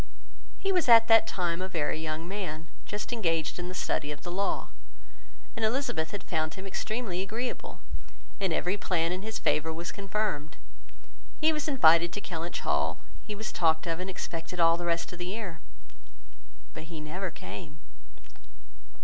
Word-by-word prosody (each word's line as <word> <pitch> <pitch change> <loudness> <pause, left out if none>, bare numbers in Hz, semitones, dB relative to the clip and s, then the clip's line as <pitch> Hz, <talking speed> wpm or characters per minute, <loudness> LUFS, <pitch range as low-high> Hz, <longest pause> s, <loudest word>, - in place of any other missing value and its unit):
He 390 - +1
was 360 -8 +3
at 230 -1 +9
that 225 0 +8
time 175 -2 0
a 185 - -2
very 160 -2 0
young 160 +1 -3
man, 175 -5 -4 0.2
just 210 +3 -4
engaged 165 -8 +1
in 175 - -3
the 185 - -5
study 150 -4 0
of 145 - -7
the 175 - -4
law; 195 +3 0 0.9
and 225 - -3
Elizabeth 205 - 0
found 155 -1 -1
him 190 - -7
extremely 195 -1 -2
agreeable, 225 +6 -4 0.6
and 190 -3 +1
every 180 +5 +1
plan 170 -4 +1
in 185 +1 -2
his 220 +2 -3
favour 160 +1 +2
was 170 +2 -4
confirmed. 195 -6 -2 0.8
He 315 +1 +5
was 300 -1 -1
invited 170 - +6
to - - -2
Kellynch 170 -3 -4
Hall; - - +1 0.2
he 210 - -6
was 215 +1 -4
talked 160 -1 +3
of 165 -1 -1
and 185 +1 -3
expected 175 -1 -5
all 165 0 +6
the 175 0 -3
rest 170 +1 0
of 180 - -8
the 175 - -3
year; 190 -4 -4 1.1
but 155 - -7
he 165 -1 -7
never 175 +5 -3
came. 165 -3 -8
180 Hz, 165 wpm, -30 LUFS, 165-205 Hz, 1.1 s, at